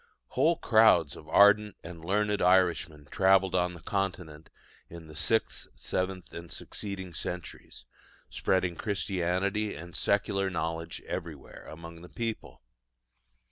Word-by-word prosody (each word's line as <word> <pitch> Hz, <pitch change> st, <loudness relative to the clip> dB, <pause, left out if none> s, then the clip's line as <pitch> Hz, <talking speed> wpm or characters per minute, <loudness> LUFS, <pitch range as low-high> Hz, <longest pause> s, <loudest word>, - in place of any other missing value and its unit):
Whole -, -, +3 dB
crowds -, -, +4 dB
of 75 Hz, -, -13 dB
ardent 105 Hz, +2 st, +5 dB
and 85 Hz, -1 st, -9 dB
learned 105 Hz, +3 st, 0 dB
Irishmen 90 Hz, -5 st, +2 dB
travelled 95 Hz, 0 st, +4 dB
on 90 Hz, -1 st, +1 dB
the 85 Hz, -, -12 dB
Continent 90 Hz, -5 st, -3 dB, 0.4 s
in 85 Hz, -1 st, -10 dB
the 75 Hz, -1 st, -13 dB
sixth, 110 Hz, +7 st, 0 dB
seventh, 95 Hz, 0 st, -3 dB
and 85 Hz, 0 st, -8 dB
succeeding 95 Hz, -3 st, -6 dB
centuries, 90 Hz, +1 st, -7 dB, 0.4 s
spreading 95 Hz, -2 st, 0 dB
Christianity 100 Hz, +1 st, -1 dB
and 85 Hz, +3 st, -10 dB
secular 100 Hz, -1 st, +1 dB
knowledge 80 Hz, -1 st, -4 dB
everywhere 80 Hz, -5 st, -7 dB
among 85 Hz, +1 st, -10 dB
the 90 Hz, -, -12 dB
people. 115 Hz, -, -5 dB
90 Hz, 120 wpm, -29 LUFS, 85-100 Hz, 0.4 s, ardent